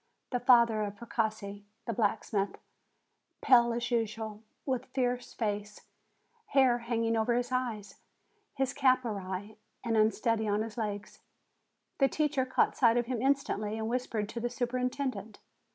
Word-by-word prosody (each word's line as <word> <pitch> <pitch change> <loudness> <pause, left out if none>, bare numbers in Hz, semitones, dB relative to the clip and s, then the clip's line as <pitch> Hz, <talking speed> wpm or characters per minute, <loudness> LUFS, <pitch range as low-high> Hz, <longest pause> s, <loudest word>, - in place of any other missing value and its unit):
The 250 - 0
father 235 -3 +5
of 205 -1 -3
Precossi, 215 -2 -3 0.2
the 230 - -2
blacksmith, 205 -1 0 0.8
pale 240 -2 +6
as 240 +1 -2
usual, 220 -2 -2 0.2
with 260 -2 -2
fierce 250 -1 -2
face, 210 -2 -3 0.7
hair 260 -3 +4
hanging 230 -1 0
over 225 +2 +2
his 245 0 -1
eyes, 225 -6 -3 0.6
his 270 -1 0
cap 255 -1 +3
awry, 200 0 -5 0.3
and 230 -2 0
unsteady 220 +1 +2
on 210 +1 +1
his 225 -1 -7
legs. 205 -3 -4 0.8
The 275 - +5
teacher 275 -3 0
caught 260 - +2
sight 235 -2 +4
of 240 - +1
him 240 -2 -2
instantly, 245 -6 0
and 220 0 -2
whispered 230 -3 -2
to 235 - -5
the 240 +1 -1
superintendent. 250 -3 -2
230 Hz, 140 wpm, -31 LUFS, 215-250 Hz, 0.8 s, pale